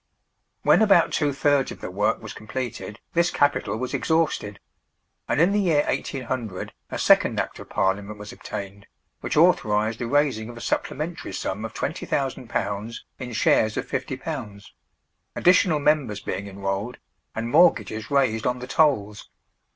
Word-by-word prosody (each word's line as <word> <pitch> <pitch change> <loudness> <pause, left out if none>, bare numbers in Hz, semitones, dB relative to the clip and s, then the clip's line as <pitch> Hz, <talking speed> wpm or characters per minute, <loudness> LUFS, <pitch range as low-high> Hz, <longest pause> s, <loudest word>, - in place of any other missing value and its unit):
When - - +5
about 200 -6 +5
two 145 -2 +1
thirds 140 0 +2
of - - -9
the - - -6
work 105 +5 0
was 110 - -7
completed 115 -1 -6
this 170 0 +3
capital 125 -7 +1
was 125 +2 -4
exhausted; 160 -11 0 0.7
and - - 0
in 175 +4 +5
the 205 - +2
year 165 -7 +2
1800 125 -7 -3 0.2
a - - -4
second - - +4
Act - - -3
of - - -11
Parliament 100 +2 -1
was 105 0 -9
obtained, 100 -1 -7 0.3
which - - -3
authorised 110 -10 +3
the 120 - -2
raising 135 -5 +1
of 120 - -9
a - - -7
supplementary 160 +7 -3
sum 105 +4 -3
of 110 - -8
£20,000 120 -7 -2 0.2
in 125 -2 -6
shares 110 0 +2
of - - -3
£50; 100 -2 -5 0.7
additional 180 -2 +4
members 145 -8 +1
being 95 +2 -4
enrolled, 100 +4 -3 0.4
and 115 +1 -3
mortgages 115 -11 +3
raised 130 -6 +2
on 125 0 0
the 125 - -7
tolls. 110 -9 +1
120 Hz, 150 wpm, -24 LUFS, 105-145 Hz, 0.7 s, When